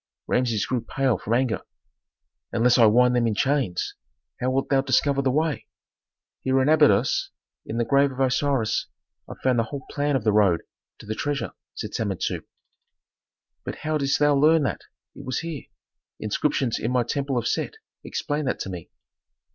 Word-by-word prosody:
Rameses 115 -5 +1
grew 125 -2 -1
pale 130 -4 0
from 115 - -1
anger. 125 -2 0 0.9
"Unless 120 +2 +3
I 115 - +8
wind 125 +3 +4
them 120 -1 +2
in 110 - 0
chains! 130 -7 0 0.5
How 125 - 0
wilt 135 +1 0
thou 135 -1 +4
discover 140 +1 +2
the 135 - +1
way?" 150 +2 0 0.7
"Here 130 0 +2
in 130 +2 +2
Abydos, 140 -7 +4 0.4
in 115 - -4
the 120 - +1
grave 140 +1 +3
of 130 - -9
Osiris, 130 -3 +1 0.4
I - - -7
found 130 -2 +3
the 115 - +1
whole 140 +3 -7
plan 145 0 0
of 130 - 0
the 110 - +3
road 100 -5 +4 0.4
to - - -13
the 110 - -3
treasure," 145 +4 -2 0.2
said - - -6
Samentu. 100 -5 -2 1.2
"But - - -5
how 155 0 0
didst 140 -1 +1
thou 145 0 +4
learn 155 +2 +4
that 140 - -2 0.3
it 140 - -11
was 130 -2 -2
here?" 165 -4 -6 0.5
"Inscriptions 120 +3 0
in 115 - -2
my 125 -1 +2
temple 135 +2 -2
of 120 -1 -1
Set - - -1 0.3
explained 145 -2 -3
that - - 0
to 95 - -4
me." 85 -2 -8
130 Hz, 175 wpm, -24 LUFS, 115-140 Hz, 1.2 s, I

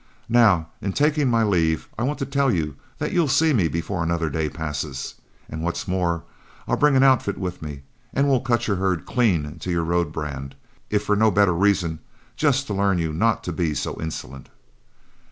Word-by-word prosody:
Now 105 -9 +4
in 100 0 -2
taking 150 -2 +2
my 115 -1 +3
leave, 80 -6 +1
I - - -5
want 140 +5 0
to 135 - -2
tell 140 -1 +1
you 75 - -1 0.2
that - - -2
you'll 170 -3 +3
see 160 +3 +3
me 95 -10 +3
before 85 +3 -3
another 85 -1 -1
day 80 +1 -1
passes, 75 -3 -4 0.3
and 80 - -6
what's 85 +4 -3
more, 85 -3 0 0.4
I'll - - +2
bring 150 -2 +3
an 130 - +5
outfit 130 -7 +3
with 90 -2 -4
me 75 -3 -7 0.3
and 140 +1 +1
we'll 135 -2 +3
cut 120 -2 0
your 100 -3 +1
herd 90 -3 0
clean 85 - 0
to 90 - -6
your 85 -1 +1
road 85 -1 0
brand, 70 -4 -5 0.3
if 105 -1 +1
for 105 - +1
no 110 +1 +4
better 100 -3 +3
reasons, 90 -3 +1 0.4
just 140 -3 +2
to 105 - -4
learn 100 -1 +2
you 80 -2 -1
not 110 +8 +1
to 90 - -3
be 80 -2 -1
so - - -3
insolent." 75 -4 -6
90 Hz, 200 wpm, -23 LUFS, 80-120 Hz, 0.4 s, an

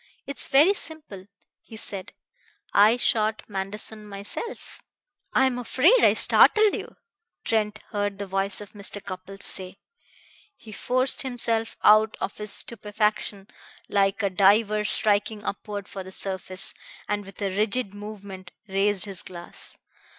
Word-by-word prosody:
"It's 280 -2 -3
very 300 +9 +5
simple," 300 - -6 0.3
he 220 - -12
said. 200 -3 -5 0.6
"I 215 +4 +6
shot 220 -2 +1
Manderson 210 +2 -5
myself." 205 - -6 0.5
"I 265 - +4
am 250 -2 0
afraid 305 - +4
I - - +6
startled 430 -1 +6
you," - - -6 0.5
Trent 215 -1 0
heard 205 -1 -2
the 200 - -4
voice 195 +1 -1
of 205 - -10
Mr. 205 0 -4
Cupples 195 +1 -8
say. 185 0 -4 0.8
He 220 - -14
forced 255 +5 0
himself 230 -3 -1
out 215 0 +5
of 195 - -4
his 210 -1 -4
stupefaction 210 -2 -1 0.4
like 200 +1 +1
a 200 - +1
diver 210 +3 +3
striking 210 0 +2
upward 205 -1 -5
for 195 - -7
the 190 - -11
surface, 190 -1 -2 0.3
and 205 0 -1
with 195 0 -13
a 195 -2 -2
rigid 210 0 +1
movement 200 -3 -9 0.2
raised 195 0 +3
his 195 -3 -6
glass. 175 -1 -6
205 Hz, 135 wpm, -25 LUFS, 195-220 Hz, 0.8 s, I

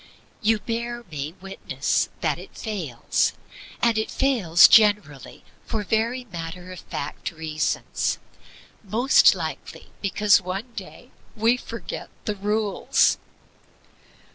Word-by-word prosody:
You 225 0 +3
bear 235 +2 -4
me 150 +1 -4
witness 195 0 -1
that - - 0
it - - -12
fails. 175 - -1 0.5
And 230 -2 +3
it 220 - -2
fails 195 -11 +5
generally 205 - +3 0.2
for 220 -2 -2
very 230 +5 0
matter 180 -2 -7
of 185 - -8
fact 145 - -5
reasons 155 -2 -2 0.7
most 235 +7 +5
likely - - -7
because 200 0 +4
one 195 +7 -5
day - - -10 0.2
we 225 +2 +3
forget 230 -2 -7 0.2
the 210 - 0
rules. 210 +1 +1
210 Hz, 110 wpm, -24 LUFS, 175-230 Hz, 0.7 s, fails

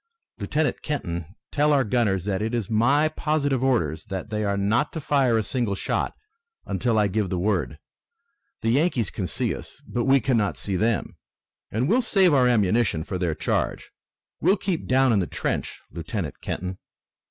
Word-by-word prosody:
Lieutenant 155 0 -1
Kenton, 85 - -4 0.2
tell 150 +1 +3
our 140 -2 +4
gunners 105 -6 +1
that 100 -1 -1
it 110 +2 -1
is 115 -1 -3
my 140 +8 +4
positive 145 -4 0
orders 80 - +1
that 95 +3 -5
they 105 0 -1
are 100 -1 0
not 110 +8 +1
to 160 - -3
fire 135 -5 +2
a 110 - +1
single 115 -2 -1
shot - - -2 0.5
until 110 +3 0
I 105 -1 +4
give 100 0 -1
the 90 - -1
word. 105 +5 0 0.8
The 115 - +1
Yankees 135 - +1
can 95 - -3
see 120 -3 -1
us, 70 - -10
but 120 - -1
we 135 +1 +5
cannot 115 -5 +1
see 100 - -3
them, 110 +4 0 0.5
and 120 +5 0
we'll 235 +8 +3
save 195 -7 +4
our 130 -3 +5
ammunition 105 -6 +2
for 90 +2 -4
their 85 -4 0
charge. - - -2 0.7
Keep 185 -5 0
well - - -11
down 130 -1 +4
in 105 - +3
the 90 - -1
trench, - - -3
Lieutenant 85 0 -5
Kenton!" 90 +1 -4
115 Hz, 175 wpm, -25 LUFS, 95-135 Hz, 0.8 s, we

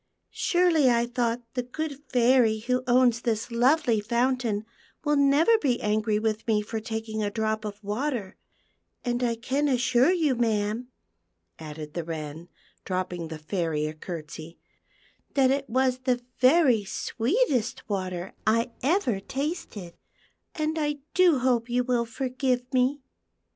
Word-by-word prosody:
Surely, 345 -6 +3
I 235 -1 +3
thought, 240 0 -1
the 250 - -1
good 285 +3 -5
Fairy 245 -2 +4
who 250 +3 -1
owns 245 -2 +4
this 230 0 -2
lovely 245 0 +3
fountain 235 -1 0 0.4
will 295 -1 +2
never 285 +10 +4
be 255 - +1
angry 215 0 +1
with 215 +1 -2
me 215 -2 +2
for 220 +1 -4
taking 220 -1 -4
a 205 - 0
drop 220 0 -1
of 205 -1 -5
water; 215 -1 -3 0.7
and 245 0 -1
I 235 -2 +1
can 265 +6 -1
assure 255 +2 +3
you, 320 -7 +2
ma'am," 225 0 0 0.7
added 150 -1 -8
the 170 - -3
Wren, 160 +1 -6 0.3
dropping 180 -2 -3
the 160 0 -6
Fairy 160 -2 -2
a 155 - -3
curtsey, 160 0 -8 0.4
" - - -36
that 265 -2 +4
it 275 0 -1
was 255 +1 +1
the 255 -1 0 0.2
very 255 -5 +5
sweetest 250 - -1
water 185 -3 -3
I 230 +3 +2
ever 275 - +1
tasted, 255 - -5 0.6
and 315 0 -1
I 295 -1 -1 0.2
do 360 -5 +5
hope 245 -2 +1
\'0u 245 0 0
will 240 -2 +1
forgive 255 0 -1
me." 260 +2 +1
240 Hz, 145 wpm, -26 LUFS, 210-265 Hz, 0.7 s, very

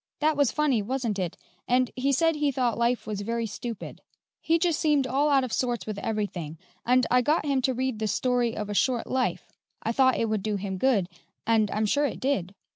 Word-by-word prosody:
That 310 0 +2
was 285 -3 +2
funny, 290 -7 +1
wasn't 230 -2 -2
it? 180 -2 -3 0.3
And 250 0 +2
he 270 +2 +1
said 325 +4 +2
he 295 -1 +1
thought 250 -3 0
life 235 +1 0
was 210 -2 -4
very 230 +2 -2
stupid. 225 0 -7 0.4
He 330 +1 +2
just 335 -2 +1
seemed 295 -3 +2
all 275 +4 +1
out 275 -2 +4
of 250 - -4
sorts 245 -2 -1
with 215 -2 -5
everything, 195 -8 -3 0.3
and 250 0 +3
I 250 0 +5
got 300 +4 +1
him 275 -2 +1
to 260 +1 +1
read 260 -3 -2
the 220 - -1
'Story 245 0 0
of 210 -1 -3
a 205 - -4
Short 245 +3 +1
Life;' 260 -1 -2 0.3
I 225 - 0
thought 260 +1 +3
it 230 - 0
would 215 -2 -1
do 210 +1 -1
him 195 -1 -4
good, 220 -8 +2 0.4
and 220 -2 +3
I'm 215 +2 0
sure 285 +7 +2
it - - -6
did." 200 -9 -1
245 Hz, 220 wpm, -26 LUFS, 215-270 Hz, 0.4 s, I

